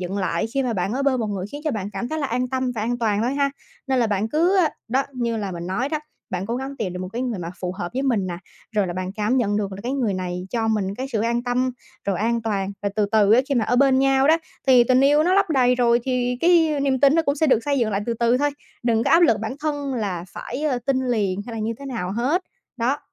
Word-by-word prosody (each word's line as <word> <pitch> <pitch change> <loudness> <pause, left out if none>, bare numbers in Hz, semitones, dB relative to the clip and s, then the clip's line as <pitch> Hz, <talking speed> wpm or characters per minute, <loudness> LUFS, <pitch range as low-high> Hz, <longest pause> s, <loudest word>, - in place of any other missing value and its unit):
dựng 185 +2 -3
lại 185 0 0
khi 270 - +2
mà 245 -2 -1
bạn 195 +1 -1
ở 275 +2 -1
bên 260 -3 +2
một 220 - -1
người 195 -2 -3
khiến 290 - -6
cho 305 - +1
bạn 200 -4 -3
cảm 240 - -4
thấy 315 - -3
là 285 - -1
an 250 0 -1
tâm 260 -1 -1
và 215 - -3
an 240 +2 -1
toàn 215 -2 +1
thôi 255 +3 0
ha. 280 -1 +1 0.4
Nên 265 -1 +1
là 235 - +3
bạn 210 +1 -1
cứ, 345 - +2
a, 330 -4 +4 0.2
đó, 260 +4 +2
như 235 -2 -1
là 200 -3 -3
mình 170 0 -6
nói 240 +9 -1
đó, 310 0 -1 0.3
bạn 185 +1 -3
cố 235 +2 -2
gắng 270 +1 -5
tìm 190 -7 -3
được 180 - -5
một 185 - -4
cái 245 +2 -2
người 240 -6 -2
mà 170 -1 -5
phù 180 -1 -2
hợp 175 -2 -4
với 265 +2 -2
mình 230 -8 +1
nè, 175 -2 -4 0.4
rồi 205 -3 +1
là 175 - -3
bạn 185 +1 -4
cảm 215 +5 0
nhận 205 -4 +1
được 200 -2 -2
là 190 - -7
cái 250 +3 -2
người 240 -8 0
này 180 0 -4
cho 225 -2 0
mình 200 -3 0
cái 260 +3 -4
sự 215 - 0
an 235 +1 0
tâm, 250 +1 0 0.3
rồi 195 -3 -1
an 230 +1 0
toàn, 200 -3 -2
rồi 200 - 0
từ 210 -1 +2
từ 210 -1 +5
á 245 - +7
khi 280 - +1
mà 235 - +2
ở 245 - +1
bên 265 0 +4
nhau 270 0 +3
đó, 320 - +6 0.3
thì 250 -2 +6
tình 255 +1 +4
yêu 290 +3 +5
nó 365 +3 +3
lấp 395 -3 +3
đầy 250 -4 +4
rồi 240 -1 +3
thì 250 -1 0
cái 325 -4 +4
niềm 270 -2 +1
tin 280 0 +6
nó 330 - +3
cũng 280 -2 +1
sẽ 315 - +2
được 260 - +4
xây 285 -2 +1
dựng 225 -3 +1
lại 195 - 0
từ 235 - 0
từ 235 +2 +2
thôi. 290 +1 +2 0.3
Đừng 230 -1 +1
có - - +1
áp 335 - +6
lực 230 -10 +4
bản 220 +4 -3
thân 290 -3 -2
là 190 -7 -3
phải, 285 - -6
ờ, 265 -5 +1
tin 270 -1 +2
liền 205 -5 0
hay 235 - -7
là - - -4
như 220 +2 -1
thế 280 - -8
nào 210 -8 -3
hết. 275 - 0 0.3
Đó, 255 +4 0
240 Hz, 300 wpm, -23 LUFS, 205-270 Hz, 0.4 s, á